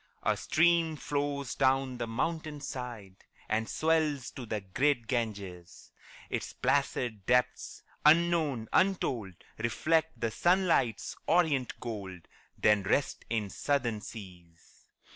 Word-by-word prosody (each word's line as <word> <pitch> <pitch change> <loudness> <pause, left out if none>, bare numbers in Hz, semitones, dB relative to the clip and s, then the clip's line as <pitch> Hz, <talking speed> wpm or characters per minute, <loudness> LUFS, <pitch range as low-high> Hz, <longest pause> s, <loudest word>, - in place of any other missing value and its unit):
A - - +2
stream 165 -1 +3
flows 140 -2 -2
down 130 -1 +1
the 120 - -2
mountain 155 +5 -2
side, 120 -8 -7 0.3
And 110 +1 -1
swells 155 -4 +1
to 125 -3 -8
the 105 0 -2
great 120 +6 +1
Ganges; 100 -7 -4 0.4
Its - - -3
placid 110 -5 0
depths, 125 0 +1 0.2
unknown, 155 -6 +3
untold, 125 - +1 0.2
Reflect 160 +8 +1
the 115 -1 -1
sunlight's 175 - +2
orient 155 -7 +2
gold, 100 -7 -6 0.3
Then 105 -1 +4
rest 105 +8 0
in 105 -4 -1
southern 120 -7 -1
seas. 90 -6 -12
125 Hz, 110 wpm, -30 LUFS, 110-150 Hz, 0.4 s, Then